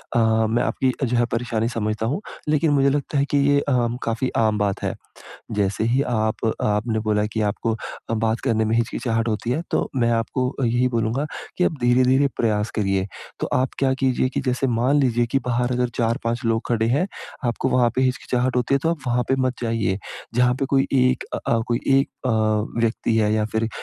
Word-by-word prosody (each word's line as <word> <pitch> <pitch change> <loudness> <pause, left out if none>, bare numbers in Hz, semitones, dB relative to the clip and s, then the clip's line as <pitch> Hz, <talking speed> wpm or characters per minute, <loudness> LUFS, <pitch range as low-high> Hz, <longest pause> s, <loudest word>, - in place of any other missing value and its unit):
अ, - - +4 0.3
मैं 115 +2 +1
आपकी 130 - +1
जो 125 -1 +1
है 120 - +3
परेशानी 115 -1 -1
समझता 110 -2 -2
हूँ। 145 - -2 0.3
लेकिन 150 +1 +2
मुझे 140 -1 +4
लगता 145 +1 -1
है 140 - +3
कि 145 - +3
ये 140 0 +4
अ, 125 -4 +1 0.2
काफ़ी 115 +3 -1
आम 110 -2 +2
बात 100 -2 -1
है। - - -1 0.6
जैसे 105 0 0
ही 125 +4 +2
आप 110 -4 -1 0.2
आपने 105 +2 0
बोला 105 -1 +1
की 110 - 0
आपको 110 +2 -2
अ, 115 +1 -6
बात 110 +1 0
करने 110 -4 +2
में 110 +1 +1
हिचकिचाहट 115 0 0
होती 110 +2 -2
है 145 +7 0
तो - - 0
मैं 120 -2 +2
आपको 125 +3 -1
यही 120 +2 +2
बोलूँगा 120 +4 -1 0.3
कि 180 - +3
आप - - +2
धीरे-धीरे 130 +3 +4
प्रयास 105 -2 0
करिए। 95 -3 +1 0.3
तो - - 0
आप 130 0 +1
क्या 135 -1 +2
कीजिए 130 -1 +1
कि 130 - -2
जैसे 130 +1 +1
मान 125 +4 +2
लीजिए 120 -3 +2
कि 135 - +4
बाहर 125 +1 0
अगर 125 0 +1
4-5 115 0 0
लोग 115 0 +1
खड़े 115 -2 +1
हैं, 140 +10 +2 0.4
आपको 120 +2 -1
वहाँ 125 -2 +3
पे 130 - +3
हिचकिचाहट 125 0 0
होती 125 +2 +1
है - - +3
तो 165 - +2
आप 170 - -2
वहाँ 125 0 +2
पे 135 - +2
मत 130 - -1
जाइए। 115 -4 0 0.4
जहाँ 125 +1 +3
पे - - +2
कोई 135 0 +2
एक 130 -1 +2
अ - - -1
अ, 115 - +2
कोई 120 0 0
एक 135 0 +3 0.2
अ, - - +2 0.5
व्यक्ति 115 0 0
है 105 -1 +2
या 110 -1 +1
फिर 110 0 0
120 Hz, 210 wpm, -22 LUFS, 115-130 Hz, 0.6 s, अ